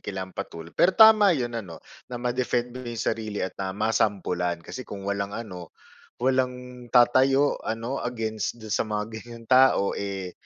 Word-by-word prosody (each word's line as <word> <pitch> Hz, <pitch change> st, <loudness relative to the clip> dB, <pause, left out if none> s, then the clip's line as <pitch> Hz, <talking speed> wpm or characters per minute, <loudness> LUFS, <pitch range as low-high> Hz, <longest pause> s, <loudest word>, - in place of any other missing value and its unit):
kailangan 95 Hz, -1 st, -6 dB
patul 85 Hz, 0 st, -7 dB
pero 185 Hz, +1 st, +3 dB
tama 215 Hz, -5 st, +7 dB
yun 120 Hz, -2 st, -2 dB
ano 95 Hz, -8 st, -6 dB, 0.3 s
na, 125 Hz, -, -5 dB
ma-defend 120 Hz, 0 st, -1 dB
mo 130 Hz, -, -7 dB
yung 115 Hz, -1 st, -4 dB
sarili 105 Hz, -4 st, -2 dB
at 95 Hz, -, -5 dB
na 95 Hz, 0 st, -3 dB
masampulan. 90 Hz, -6 st, 0 dB
Kasi 130 Hz, -, -7 dB
kung 100 Hz, -5 st, -8 dB
walang 100 Hz, 0 st, -2 dB
ano, 90 Hz, -7 st, -7 dB, 0.5 s
walang 125 Hz, -1 st, -2 dB
tatayo 130 Hz, +3 st, +4 dB
ano 115 Hz, +4 st, -3 dB
against 110 Hz, -2 st, -3 dB
dun 110 Hz, -2 st, -7 dB
sa 110 Hz, -, 0 dB
mga 105 Hz, 0 st, -1 dB, 0.2 s
ganyang 115 Hz, 0 st, -12 dB
tao, 130 Hz, -5 st, +4 dB
eh, 95 Hz, -2 st, -4 dB
115 Hz, 160 wpm, -25 LUFS, 100-125 Hz, 0.5 s, tama